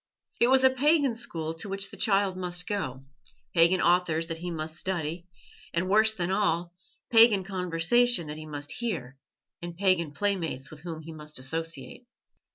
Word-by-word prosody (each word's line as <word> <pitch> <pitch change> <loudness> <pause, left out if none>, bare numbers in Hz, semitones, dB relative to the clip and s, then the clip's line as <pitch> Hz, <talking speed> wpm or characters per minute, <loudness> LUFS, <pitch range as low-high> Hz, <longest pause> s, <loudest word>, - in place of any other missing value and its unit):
It 235 - +5
was 265 +1 +4
a 260 - +6
pagan 285 0 +3
school 165 -9 -4
to 165 +5 -8
which 195 0 -3
the - - -8
child 195 -3 +2
must 180 -1 -3
go, 135 -10 -4 0.5
pagan 170 +2 +5
authors 170 -2 +2
that 165 0 -4
he 175 +1 -5
must 155 -1 -4
study, 175 -1 -3 0.5
and, 170 +2 0
worse 220 +1 +5
than 180 -4 -2
all, 175 -4 0 0.4
pagan 225 -4 +6
conversation 180 +3 +2
that 150 0 -6
he 155 0 -9
must 145 -1 -4
hear 150 - -4 0.4
and 170 -1 -7
pagan 185 -5 +2
playmates 165 -6 -2
with 155 - -11
whom 165 -2 -6
he 160 +1 -9
must 150 -1 -8
associate. 165 - -5
175 Hz, 165 wpm, -27 LUFS, 160-200 Hz, 0.5 s, a